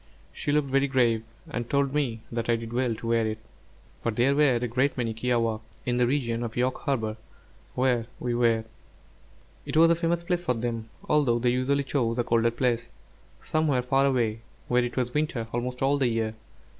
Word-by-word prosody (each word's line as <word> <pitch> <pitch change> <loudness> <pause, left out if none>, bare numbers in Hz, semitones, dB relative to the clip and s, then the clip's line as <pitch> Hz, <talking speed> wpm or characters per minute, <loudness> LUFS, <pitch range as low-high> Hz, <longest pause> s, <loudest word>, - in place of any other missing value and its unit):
She - - -2
looked 145 -2 +1
very 135 +1 +3
grave, 120 -4 +2 0.3
and 120 -1 -4
told 140 -1 +1
me 125 -7 -1
that 115 0 -3
I 120 - +4
did 115 0 -6
well 125 -2 +1
to 115 - -7
wear 115 -1 +2
it, 110 0 -3 0.6
for - - 0
there 120 +5 +2
were 140 -3 +4
a 120 +1 -1
great 130 +4 0
many 115 -2 -1
kiawākq' 115 -1 0 0.2
in 125 -1 0
the 125 -1 +3
region 120 -4 0
of 115 -1 -5
York 125 +1 +1
Harbor 110 -6 -1 0.6
where 125 -3 +1
we 120 -1 -1
were; 115 -2 +2 1.0
it - - -3
was 165 +1 +7
a - - +4
famous 170 0 0
place 175 0 -1
for 145 -8 +1
them, 115 -1 -3 0.2
although 140 -6 +3
they 120 +1 +2
usually 135 +3 +1
chose 125 -3 0
a 120 - +2
colder 115 -1 +2
place, 120 0 0 0.5
somewhere 150 -5 +1
far 135 +2 +3
away, 115 -5 +1 0.3
where 125 0 +3
it 120 +1 -4
was 125 -1 0
winter 150 -6 -1
almost 125 +2 -2
all 140 +1 +3
the 130 - +3
year. 115 -2 -1
125 Hz, 195 wpm, -27 LUFS, 115-135 Hz, 1.0 s, was